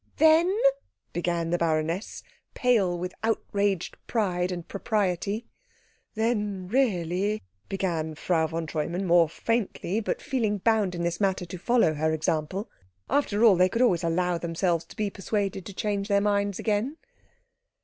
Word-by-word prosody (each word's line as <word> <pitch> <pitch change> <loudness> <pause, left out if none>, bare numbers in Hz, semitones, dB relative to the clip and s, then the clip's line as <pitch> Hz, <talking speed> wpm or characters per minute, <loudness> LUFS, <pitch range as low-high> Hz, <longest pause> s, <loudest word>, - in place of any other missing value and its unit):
"Then 320 +3 +5 0.3
" - - -47
began 170 -1 -1
the 175 - +1
baroness, 165 +4 -1 0.3
pale 210 -9 +2
with 180 +1 -4
outraged 200 -4 0
pride 185 -5 0
and 175 -2 -5
propriety. 205 +1 -1 0.7
"Then 210 -4 -1
really 200 -4 0
" 95 - -41
began 165 -5 -2
Frau 160 0 +1
von 165 +1 -3
Treumann 165 +4 -2
more 170 -2 +5
faintly, 220 0 -1
but 220 - -2
feeling 225 -6 -1
bound 205 -2 +1
in 170 - -3
this 170 +1 -2
matter 190 -2 +1
to 180 +2 -7
follow 235 -6 +3
her 155 +1 0
example. 160 +6 -1 0.4
After 230 -7 +2
all, 210 -4 +7
they 180 +1 +4
could 235 +5 +1
always 180 -8 +3
allow 175 +1 +1
themselves 170 0 0
to - - -14
be 210 -2 -1
persuaded 195 -1 -2
to 200 - -8
change 200 -1 -1
their 200 -1 +3
minds 200 -1 +1
again. 225 +8 -1
190 Hz, 150 wpm, -27 LUFS, 170-210 Hz, 0.7 s, all